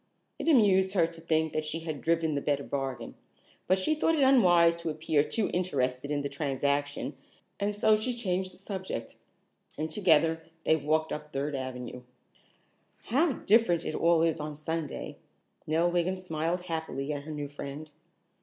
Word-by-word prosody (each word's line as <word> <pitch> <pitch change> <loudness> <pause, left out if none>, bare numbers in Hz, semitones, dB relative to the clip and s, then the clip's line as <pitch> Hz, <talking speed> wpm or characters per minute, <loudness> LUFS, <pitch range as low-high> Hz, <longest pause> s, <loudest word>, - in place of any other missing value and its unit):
It - - -4
amused 195 - +5
her 175 -5 +4
to 165 0 -9
think 160 -1 0
that 155 - -1
she 155 +2 -4
had 155 -3 -5
driven 165 -1 +1
the 140 - -1
better 140 -1 0
bargain, 135 -5 -4 0.5
but 185 - +4
she 190 +11 +1
thought 325 +1 +2
it 290 - +3
unwise 175 -11 +6
to 170 -1 -4
appear 155 -1 +1
too 210 +6 -1
interested 140 -7 -1
in 145 -1 0
the 140 - -2
transaction, 140 0 -1 0.4
and 205 +1 -1
so 215 +1 +4
she 235 +3 -2
changed 185 -5 -1
the 180 - -13
subject, 190 - -5 0.6
and 155 +1 -3
together 165 -4 +3 0.2
they 160 - +4
walked 155 +1 0
up 150 0 -7
Third 140 +2 -2
Avenue. 125 -2 -5 1.0
"How 280 +6 +2
different 210 -7 +3
it - - -2
all 165 0 +3
is 165 -1 +1
on 150 -1 -5
Sunday," 160 -1 -4 0.5
Nell 165 +3 +2
Wiggin 175 +2 0
smiled 170 -1 -2
happily 160 -4 -3
at 145 - -4
her 155 +2 -8
new 145 -1 -4
friend. 145 +1 -8
160 Hz, 170 wpm, -29 LUFS, 145-185 Hz, 1.0 s, unwise